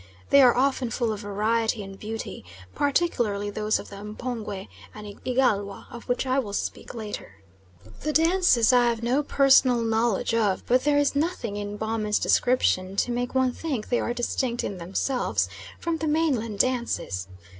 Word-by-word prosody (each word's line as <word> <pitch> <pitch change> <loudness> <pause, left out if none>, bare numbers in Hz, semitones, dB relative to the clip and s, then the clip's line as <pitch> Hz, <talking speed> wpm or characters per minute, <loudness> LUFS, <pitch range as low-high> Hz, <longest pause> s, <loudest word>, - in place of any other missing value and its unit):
They 280 - +8
are 250 -2 +6
often 260 -2 +1
full 230 0 -1
of 210 - -6
variety 215 +2 0
and 195 0 -10
beauty, 220 - -6 0.3
particularly 240 -9 0
those 215 +1 0
of - - -9
the 200 - -9
M'pongwe 210 -2 -5 0.3
and 210 -1 -10
Igalwa, 215 -6 0
of 235 0 -10
which 245 +2 0
I 260 +1 +1
will 210 -6 -4
speak - - -4
later. 210 - -7 0.6
The 305 - -2
dances 325 -7 +4
I 245 -1 +5
have 230 -1 -1
no 250 +5 +2
personal 265 -4 +4
knowledge 225 -1 +1
of, 210 -4 +1
but 250 +2 +2
there 295 -1 +3
is 290 0 +2
nothing 285 - -1
in 205 0 -5
Baumann's 220 -1 -1
description 195 -6 +2
to 240 - 0
make 245 +2 -2
one 260 -1 +3
think 265 -5 -4
they 245 - +2
are - - -1
distinct 240 0 -1
in 190 - -4
themselves 195 +9 -1 0.3
from 335 -1 -1
the 315 - -3
mainland 275 -9 0
dances. 235 - -1
235 Hz, 165 wpm, -25 LUFS, 210-260 Hz, 0.6 s, They